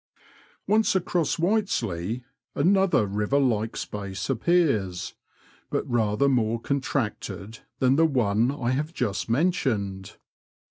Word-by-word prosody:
Once 215 0 +2
across 175 -4 +1
Whiteslea, 125 - -1 0.3
another 190 - +3
river 105 +7 0
like 115 -5 +1
space 100 +3 -4
appears, 120 - +1 0.6
but - - -2
rather 115 +2 +1
more 115 -4 +1
contracted 115 -6 -3 0.2
than 130 +1 +3
the 165 - +5
one 115 -4 +2
I 125 -4 -2
have 150 +6 -2
just 110 -3 -2
men 155 +11 +3
tioned. 100 - -3
125 Hz, 110 wpm, -26 LUFS, 105-155 Hz, 0.6 s, the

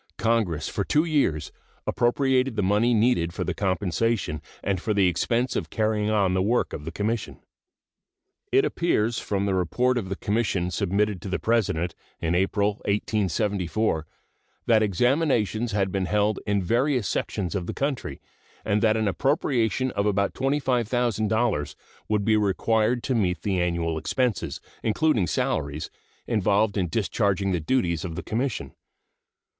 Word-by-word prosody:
Congress 110 -9 0
for 100 - -2
two 150 +9 +2
years 140 - 0 0.3
appropriated 130 +1 +1
the 105 - 0
money 105 +5 +3
needed 105 -7 +2
for - - -2
the - - -2
compensation 95 -2 -1 0.2
and 95 -3 -1
for 105 +1 -1
the 100 -2 +4
expense 115 +8 0
of - - -2
carrying 110 -1 0
on 100 -4 +2
the 95 - +2
work 115 +6 +1
of 75 - -6
the 80 - -4
Commission. 110 +5 -3 1.1
It 400 +1 +4
appears 120 - 0
from 100 -1 -1
the 100 - 0
report 120 +8 +1
of 95 -5 -6
the 100 - -2
Commission 100 -4 -1
submitted 100 0 0
to 100 - -6
the - - 0
President 90 -7 0 0.3
in 85 +1 -1
April, 100 +3 +1
1874, 100 -3 0 0.6
that 110 -2 +4
examinations 120 - +1
had 100 -2 0
been 95 -1 -1
held 105 0 +1
in 100 -2 +1
various 120 - +1
sections 95 -2 -2
of 95 -4 -3
the - - -2
country, 135 - -3 0.5
and 105 +1 +1
that 110 -1 +3
an 110 -1 0
appropriation 130 - +1
of 100 -1 0
about 100 -1 +1
$25,000 120 - 0 0.3
would 105 -2 +1
be 110 - +4
required 110 +3 +1
to 135 - 0
meet 90 -7 0
the 95 -3 0
annual 85 -2 -1
expenses, 105 - -1 0.2
including 115 - +2
salaries, 75 0 -2 0.3
involved 105 -1 +2
in 95 -4 0
discharging 100 0 0
the 90 - 0
duties 85 -3 0
of 85 -3 -5
the - - -5
Commission. 120 +2 -2
105 Hz, 150 wpm, -25 LUFS, 95-120 Hz, 1.1 s, the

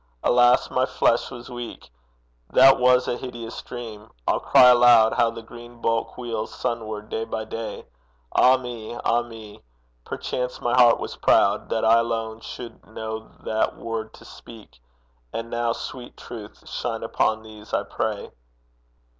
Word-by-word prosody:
Alas, 120 0 +4
my 130 - +2
flesh 115 - +1
was 120 -2 -10
weak; 120 - -8 0.6
That 135 +1 +7
was 125 0 +4
a 120 - -1
hideous 120 -3 -7
dream! 110 -3 -9 0.2
I'll - - +2
cry 125 - +7
aloud 120 -2 +6
How 115 - +3
the 115 0 -8
green 120 +1 -12
bulk 115 0 -1
wheels 115 -3 -4
sunward 110 -3 -4
day 110 - -2
by 110 -1 -4
day! 110 -1 -6 0.5
Ah 130 +1 +6
me! 120 -3 -7
ah 120 0 +1
me! 115 -3 -11 0.4
perchance 125 - -4
my 120 - -1
heart 120 -2 +6
was - - -6
proud 100 +1 +3
That 110 - 0
I 115 +1 +6
alone 115 -1 -2
should 120 +1 -9
know 110 0 -6
that 110 0 -1
word 115 -1 -5
to - - -16
speak; 110 - -14 0.5
And 115 0 -5
now, 120 0 0
sweet 120 +1 -7
Truth, 110 -4 -10
shine - - -4
upon 110 0 0
these, 110 -1 -13
I - - 0
pray.' - - -3
115 Hz, 155 wpm, -24 LUFS, 110-120 Hz, 0.6 s, That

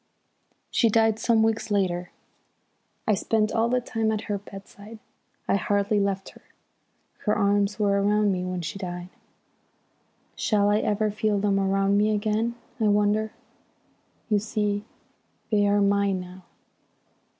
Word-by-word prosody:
"She 230 - +3
died 225 0 +3
some 225 -1 +3
weeks 225 0 0
later. 180 -3 0 1.0
I 215 - +4
spent 215 +2 +1
all 230 +1 +1
the 250 +1 +2
time 225 -2 -1
at 215 -1 -1
her 205 -2 -3
bedside, 200 +2 -12 0.5
I - - +3
hardly 205 +1 +1
left 195 -1 -1
her. - - -17 0.8
Her 210 - +2
arms 205 0 +1
were 200 -2 +2
round 210 0 +2
me 180 -1 -2
when 180 -1 -3
she 165 +4 -5
died. 175 -1 -6 1.3
Shall 205 -2 +2
I 210 - +3
ever 210 0 0
feel 210 0 0
them 200 0 +1
round 195 +1 +2
me 215 +1 +2
again? 215 +3 -1 0.2
I 220 - +1
wonder! 210 +1 +2 1.0
You 210 -2 +2
see, 210 -1 -2 0.7
they 205 -1 +3
are 205 0 +3
mine 200 -1 +2
now. 180 0 -11
205 Hz, 140 wpm, -25 LUFS, 200-215 Hz, 1.3 s, I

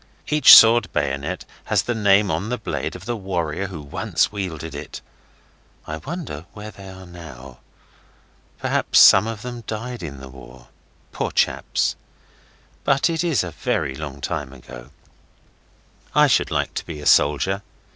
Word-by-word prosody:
Each 150 -3 +9
sword 115 0 +6
bayonet 70 -1 -2 0.2
has - - +1
the 120 - -2
name 100 -2 +3
on 105 - -2
the 125 - -2
blade 110 - -4
of - - -10
the 120 - -2
warrior 95 -3 -3
who 85 -6 -8
once 70 - -1
wielded 80 -6 -5
it. 75 +1 -8 0.9
I 80 - -5
wonder 85 - -7
where 105 0 -9
they 95 0 -12
are 95 0 -11
now. 70 -8 -12 1.0
Perhaps - - 0
some 95 +3 +8
of 115 -2 -6
them 120 -1 -7
died 120 +1 -5
in 70 -5 -7
the 65 - -10
war. 65 -2 -14 0.4
Poor - - -3
chaps! - - 0 0.9
But 140 +4 +2
it 165 +1 -1
is 165 - +1
a 90 - -6
very 70 - -2
long 70 -1 -8
time 70 0 -4
ago. - - -12 1.3
I - - +6
should - - +2
like - - -2
to - - -5
be 80 -3 -7
a 75 - -9
soldier. 75 +9 +3
90 Hz, 155 wpm, -22 LUFS, 70-110 Hz, 1.3 s, Each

